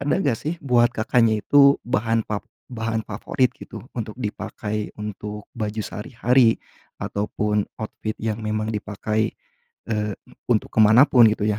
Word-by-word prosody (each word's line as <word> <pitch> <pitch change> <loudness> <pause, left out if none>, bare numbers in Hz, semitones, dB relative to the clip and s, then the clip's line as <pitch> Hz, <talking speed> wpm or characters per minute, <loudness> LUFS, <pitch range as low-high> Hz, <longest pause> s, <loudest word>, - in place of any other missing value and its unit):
ada 140 +1 +1
enggak, 140 -11 +1
sih, 160 +3 -3
buat 120 -3 +4
Kakaknya 110 -3 +1
itu 140 -1 +6
bahan 115 -2 0
fav 105 -1 -3 0.3
bahan 115 -1 -2
favorit, 120 +5 0
gitu, - - -9 0.2
untuk 110 -1 -4
dipakai 105 -2 -4
untuk 105 0 -6 0.2
baju 110 0 -2
sehari-hari? 120 +2 +2 0.5
Ataupun, 105 0 -1
outfit 110 0 -5
yang 110 -1 -3
memang 110 0 -2
dipakai, 105 +1 -2 0.6
eee, 105 -2 -1 0.3
untuk 115 -3 +1
ke - - -4
mana 110 +4 +7
pun, 125 -5 +6
gitu, 110 -1 +1
ya? 105 0 +1
110 Hz, 145 wpm, -23 LUFS, 105-120 Hz, 0.6 s, mana